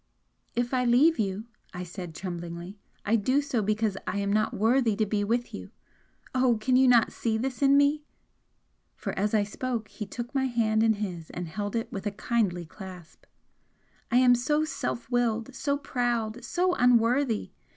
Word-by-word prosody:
"If 240 +2 -1
I 255 -1 +2
leave 270 +7 +4
you," 200 0 -1 0.3
I 180 - -4
said, 175 -2 -8
tremblingly 175 +1 -6 0.3
"I 220 - +3
do 255 +6 +2
so 285 -5 -1
because 215 -1 0
I 185 - -1
am 200 0 0
not 215 +1 +2
worthy 230 +1 +2
to 215 - +1
be 205 0 -1
with 235 +3 -1
you! - - -7 0.6
Oh, 255 -3 +3
can 250 +4 +1
you 260 +1 +5
not 240 -2 +5
see 225 -2 -1
this 255 +3 -3
in 280 0 +5
me?" 285 +1 +3 0.9
For - - -5
as 210 +3 0
I 210 - +3
spoke 225 +2 -4
he 210 - -7
took 240 +3 -6
my 265 -1 +1
hand 225 -3 +1
in 225 0 +4
his 180 -6 -5
and 180 -1 -5
held 205 +5 -4
it 230 - -2
with 200 +1 -4
a - - -1
kindly 200 -5 -1
clasp 180 -2 -12 0.8
"I 240 - +3
am 250 -1 +6
so 295 +6 +1
self 275 -5 -4
willed, 235 0 0
so 280 +2 -1
proud, 240 -4 -2
so 360 +1 +1
unworthy! 245 -2 +2
225 Hz, 180 wpm, -27 LUFS, 205-255 Hz, 0.9 s, am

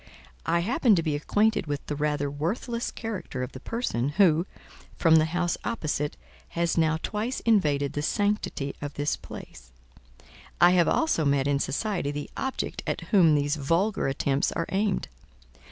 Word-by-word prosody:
"I 170 +1 +2
happen 225 +2 +3
to 165 - +1
be 155 -2 0
acquainted 205 +5 +1
with 145 -1 -3
the 150 - -3
rather 145 -1 -1
worthless 210 - -2
character 185 - -5
of 125 - -5
the 130 - -9
person, 140 - -2
who, 170 +1 +3 0.5
from 165 -2 +5
the 155 - +4
house 175 +2 -1
opposite, 155 -10 -2 0.4
has 170 -1 +1
now 160 -1 +2
twice 220 +5 -2
invaded 150 -11 +2
the 145 - -2
sanctity 205 -6 -1
of 145 0 -5
this 145 +1 0
place; 60 -1 -11 0.9
I 175 +1 +7
have 180 -2 +4
also 320 - +2
met 140 -1 +2
in 140 -1 +2
society 175 +3 -1
the 145 0 -5
object 265 0 -3
at - - -1
whom 170 -8 +6
these 145 +1 +1
vulgar 170 +9 +1
attempts 135 +1 0
are 165 - -1
aimed. 195 - 0
160 Hz, 160 wpm, -27 LUFS, 145-205 Hz, 0.9 s, I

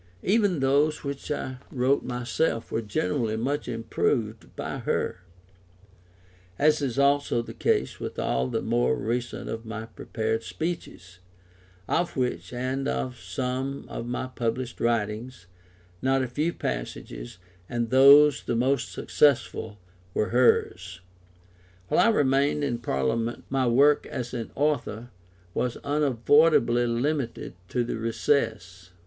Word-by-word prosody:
Even 200 -6 +2
those 145 +3 +2
which 140 0 -5
I 130 -3 -3
wrote 130 +2 +1
myself 125 0 -1
were 115 - 0
generally 110 +1 -1
much 140 +6 -2
improved 115 -1 -2
by - - -4
her, - - -1 1.4
as 155 0 +3
is 135 -3 -2
also 140 -3 +2
the - - -9
case 65 - 0
with - - -6
all 65 +1 0
the - - -2
more - - +2
recent 120 +3 -3
of 115 0 -5
my 110 -1 -6
prepared 110 0 -3
speeches, 115 - -6 0.7
of 175 -4 0
which, 125 -1 -2
and 130 +2 -2
of 125 -2 -2
some 130 +1 -3
of 115 - -5
my 125 +1 -2
published 125 0 -3
writings, 115 0 -1 0.6
not 135 0 +2
a - - -2
few 150 +7 -1
passages, - - -5 0.3
and 120 -1 -2
those 140 +2 +7
the 120 - -1
most 130 +4 +1
successful, 120 -6 +1 0.4
were 105 - +1
hers.] 95 -6 +2 0.9
While - - +3
I - - +6
remained 145 -5 +2
in 120 -4 -1
Parliament 115 - -1
my 135 -2 +2
work 140 +5 +4
as 125 -1 -5
an 115 -3 -4
author 130 -5 -1 0.4
was 125 -1 -1
unavoidably 140 -2 +3
limited 120 -1 -2 0.2
to 125 - 0
the 120 - -3
recess. 110 -6 -1
125 Hz, 130 wpm, -26 LUFS, 115-140 Hz, 1.4 s, those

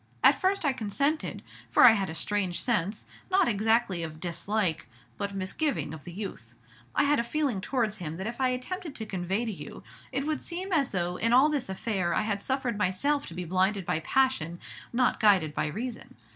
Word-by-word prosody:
At - - +6
first 380 -2 +1
I 280 - +3
consented, 275 +7 -1 0.3
for - - +7
I - - +10
had 195 -5 0
a 160 - -5
strange 190 +1 -1
sense, 210 -4 0 0.2
not 380 -5 +4
exactly 220 -4 +2
of 155 -1 -5
dislike, 175 - -1 0.3
but 200 -1 -3
misgiving, 195 - -1
of 155 -3 -10
the 175 - -7
youth. 170 - -7 0.4
I - - +4
had 290 -1 +3
a - - +1
feeling 265 -5 -1
towards 220 -1 -1
him 160 -2 -5
that 190 - -5
if 235 +3 -4
I 260 - +3
attempted 300 +6 -4
to 220 - -4
convey 195 +3 -1
to 225 - -2
you, 150 -7 -9 0.3
it 275 +2 -1
would 310 0 -1
seem 365 +2 -4
as 285 -5 +3
though 180 -1 -1
in 230 +1 +2
all 265 +5 +6
this 285 -8 -1
affair 190 -3 -1
I - - +2
had 205 -2 -1
suffered 260 -4 -1
myself 280 +11 +1
to 165 - -9
be 180 0 -4
blinded 190 +2 +1
by 155 - 0
passion, 175 -6 +1 0.3
not 250 +1 +2
guided 190 -8 +4
by 150 - 0
reason. 225 +10 -6
215 Hz, 200 wpm, -28 LUFS, 180-260 Hz, 0.4 s, I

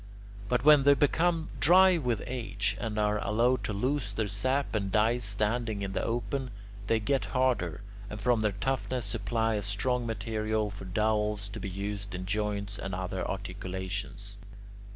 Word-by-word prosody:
But 125 +1 +1
when 150 -2 +8
they 140 +1 +6
become 160 +3 +1
dry 185 +1 +6
with 120 -6 -1
age, 115 -5 -2
or 110 -2 -3
are 105 0 +2
allowed 120 +5 +2
to - - -2
lose 115 0 -1
their 110 +1 -1
sap 130 +8 0
and 100 -3 -1
die 110 +4 +3
standing 105 0 0
in 95 -1 -4
the - - -1
open, 120 +3 -2 0.4
they 115 - +3
get 135 +5 0
harder, 125 -11 +1 0.3
and 105 - -6
from 115 +1 +2
their 105 -2 +1
toughness 130 +2 -1
supply 115 +2 0
a 105 - -1
strong 115 +5 -1
material 110 -1 -1
for 100 -1 -9
dowels 105 +1 0
to 105 +2 -7
be 100 - -4
used 100 0 -5
in 90 +1 -5
joints 105 0 -2
and 95 -1 -4
other 95 0 -3
articulations. 100 +2 -5
110 Hz, 165 wpm, -29 LUFS, 100-125 Hz, 0.4 s, when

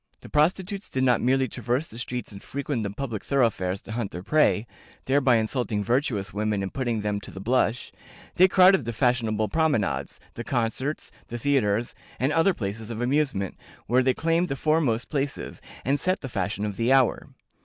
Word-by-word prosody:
The - - -12
prostitutes 185 +6 0
did 130 - -1
not 125 -3 +3
merely 130 +1 +2
traverse 125 +5 -2
the 115 -6 -10
streets 125 -1 -4
and 100 -1 -10
frequent 140 -3 -3
the 100 - -2
public 110 0 -5
thoroughfares 105 -8 +1
to - - -10
hunt 110 -3 -2
their 90 -1 -7
prey, 110 -7 +3 0.4
thereby 130 -2 +3
insulting 110 -1 0
virtuous 110 -4 0
women 105 -1 -1
and 95 - -5
putting 120 -5 -1
them 105 -1 -2
to - - -9
the 95 - -9
blush, 120 +2 0 0.4
they 185 - +6
crowded 185 - +5
the 115 - -3
fashionable 115 -3 +1
promenades, 145 - 0
the 120 - -6
concerts, 125 +4 -2 0.2
the 120 - -5
theatres, 120 -4 +1 0.3
and 135 +4 +1
other 165 +4 +3
places 105 +1 -5
of 115 -1 -5
amusement, 125 -6 0 0.3
where 125 +2 +3
they 130 0 +2
claimed 165 +2 +1
the 135 - -1
foremost 140 -6 +1
places, 140 -1 -3 0.2
and 140 +3 +2
set 185 +5 0
the 135 - -5
fashion 100 -1 -2
of 105 -2 -4
the 115 +2 +1
hour. 135 -2 +3
120 Hz, 185 wpm, -26 LUFS, 110-140 Hz, 0.4 s, they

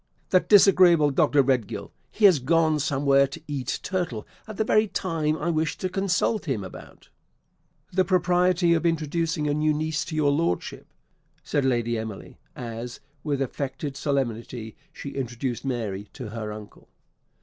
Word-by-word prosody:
"That 185 - +3
disagreeable 180 -7 +6
Dr. 145 0 +3
Redgill. 125 -6 -1 0.2
He 215 - +1
has 180 -7 +7
gone 155 +3 +2
somewhere 140 -1 +3
to 140 +5 -9
eat 140 -4 -3
turtle 175 - -3 0.2
at 215 -2 -8
the - - +2
very 215 0 +3
time 160 -6 -1
I 170 +3 -1
wished 160 0 -1
to 185 - -1
consult 195 +2 0
him 130 - -2
about 95 - -12 0.4
" - - -37
"The 185 +1 +3
propriety 180 -1 +2
of 165 - +1
introducing 165 -1 0
a 145 - +1
new 150 0 +1
niece 155 0 -1
to 155 - -6
your 150 -2 +3
Lordship," 145 - -2 0.6
said 145 -2 0
Lady 120 -3 0
Emily, 110 -3 -8 0.2
as, 120 0 -6 0.2
with 140 -3 0
affected 140 +2 -4
solemnity, 120 -5 -3 0.2
she 140 - -8
introduced 125 -2 -4
Mary 110 -7 -3
to 125 -6 -7
her 110 -1 -5
uncle. 105 0 -11
145 Hz, 155 wpm, -25 LUFS, 125-170 Hz, 0.6 s, has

